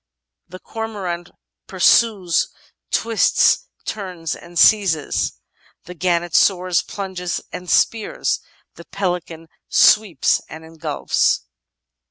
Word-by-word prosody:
"The 180 +1 -10
Cormorant 195 -6 -5 0.4
pursues, 190 -1 +3 0.4
twists, 230 - +2 0.2
turns, 180 -6 -5
and 175 0 -12
seizes; 180 -7 +3 0.5
the 180 - -10
Gannet 175 -1 -1
soars, 185 -2 +3
plunges, 185 -3 -5
and 180 -1 -8
spears; 225 -2 +1 0.4
the 170 - -12
Pelican 175 -4 -4 0.2
sweeps 205 -10 +4
and 160 +2 -10
engulfs." 160 -2 0
180 Hz, 90 wpm, -20 LUFS, 170-200 Hz, 0.5 s, sweeps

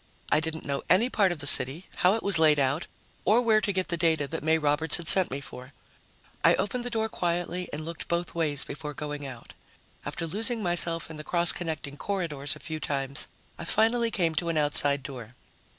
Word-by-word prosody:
I - - +4
didn't 160 0 -5
know 140 -1 -2
any 215 +9 +3
part 195 -4 +3
of 175 - -4
the 140 - -5
city, 140 +6 +3
how 185 +3 +4
it 225 - -4
was 200 -5 +3
laid 155 -2 +5
out, 140 +4 0 0.4
or 215 +4 +4
where 220 -3 +3
to 205 - 0
get 185 -1 -2
the 170 - -1
data 160 -4 +1
that - - -5
May 160 +1 +3
Roberts 150 +1 +1
had 170 -2 -6
sent 190 0 +9
me 135 - -4
for. 130 -1 -11 0.7
I - - +6
opened 240 +4 -2
the 245 - -4
door 220 -2 -1
quietly 175 -2 -2
and 155 +1 -5
looked 165 0 -7
both 170 0 -2
ways 150 -4 0
before 150 -1 -7
going 150 -2 -5
out. 125 -3 -10 0.5
After 170 - -4
losing 220 +6 0
myself 170 -2 0
in 155 - -8
the 150 - -7
cross 170 +1 +2
connecting 155 -4 -5
corridors 155 -7 -3
a - - -13
few 160 -1 -6
times, 140 0 -1 0.3
I - - -5
finally 225 +6 +2
came 170 -7 0
to 170 +2 -1
an 165 - -1
outside 145 -2 +1
door. 125 -3 -9
160 Hz, 215 wpm, -27 LUFS, 145-185 Hz, 0.7 s, sent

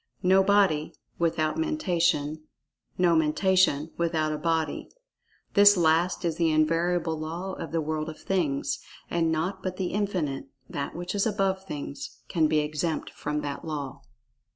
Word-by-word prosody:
No 190 +1 +5
body, 190 -6 +2 0.2
without 160 - +1
Mentation; 175 - 0 0.5
no 175 -2 +4
Mentation 160 -1 +2
without 160 -2 0
a - - -2
body. 160 -2 -1 0.6
This 205 0 +7
last 170 +2 +2
is 165 -2 -1
the 165 -1 +2
invariable 165 +1 +1
law 170 +5 -4
of 165 - -6
the 165 0 0
world 155 0 -2
of 155 - -8
Things. 145 -7 -1 0.3
And 165 -1 +1
naught 160 +5 -1
but 185 -1 -4
The 185 -2 -2
Infinite—That 140 -9 -3
which 175 +1 -4
is 205 +1 +1
above 195 -2 0
Things—can 155 +1 -3
be 155 0 +2
exempt 155 +2 -2
from 150 0 -3
that 140 -1 -5
law. 145 -4 -5
165 Hz, 140 wpm, -27 LUFS, 155-185 Hz, 0.6 s, This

